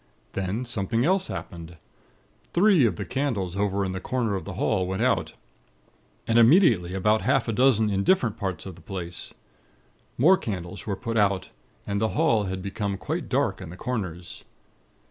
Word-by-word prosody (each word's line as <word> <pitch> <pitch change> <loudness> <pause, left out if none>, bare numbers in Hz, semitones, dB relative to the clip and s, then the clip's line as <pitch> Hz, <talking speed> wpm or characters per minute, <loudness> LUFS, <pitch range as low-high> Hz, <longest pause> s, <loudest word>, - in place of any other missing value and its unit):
Then 100 +6 -2
something 115 +1 -1
else 190 +2 +2
happened. 85 -3 -7 0.8
Three 175 - +5
of 95 - -2
the - - -5
candles 115 -10 -2
over 100 0 0
in 95 - -2
the 95 - -4
corner 120 0 -1
of 95 - -3
the 100 - -6
hall 95 0 0
went 95 +4 -1
out; 125 -6 +1 0.9
and 115 +1 +3
immediately 115 - +5
about 105 +3 +2
half 135 +1 +1
a - - 0
dozen 110 -3 +3
in 100 0 0
different 120 - +2
parts 95 -7 -4
of 95 - -7
the - - -16
place. 90 -3 -6 0.9
More 175 +10 +6
candles 90 - -6
were 100 - -1
put 115 +2 -3
out, 100 -3 +1 0.3
and 100 0 -2
the 110 - +2
hall 140 -10 +3
had 95 0 -4
become 100 0 -3
quite - - -4
dark - - 0
in - - -8
the 90 - -10
corners. 90 -9 -5
105 Hz, 175 wpm, -25 LUFS, 95-120 Hz, 0.9 s, More